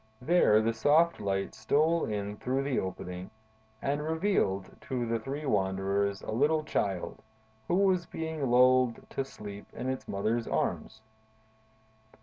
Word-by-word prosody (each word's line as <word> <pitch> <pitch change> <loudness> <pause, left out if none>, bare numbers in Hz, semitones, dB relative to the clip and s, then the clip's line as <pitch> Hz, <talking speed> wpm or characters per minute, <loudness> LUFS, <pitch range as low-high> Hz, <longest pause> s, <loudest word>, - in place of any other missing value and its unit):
There, 125 -7 +4
the 115 +1 +1
soft 155 +9 +3
light 100 -1 -1
stole 155 +9 +2
in 105 -1 -3
through 130 +4 -1
the 140 -2 0
opening 90 0 -5 0.5
and 145 +2 0
revealed 160 - 0
to 125 -2 -1
the 115 0 -1
three 140 +6 -5
wanderers 100 -2 0
a - - -5
little 150 +7 +2
Child, 100 - -2 0.5
who 175 - +1
was 185 -2 +2
being 160 -4 -3
lulled 125 0 +4
to 135 - -1
sleep 105 -6 -9
in 130 - -4
its 130 - -4
mother's 110 +4 -1
arms. 110 0 -2
120 Hz, 135 wpm, -30 LUFS, 100-150 Hz, 0.5 s, There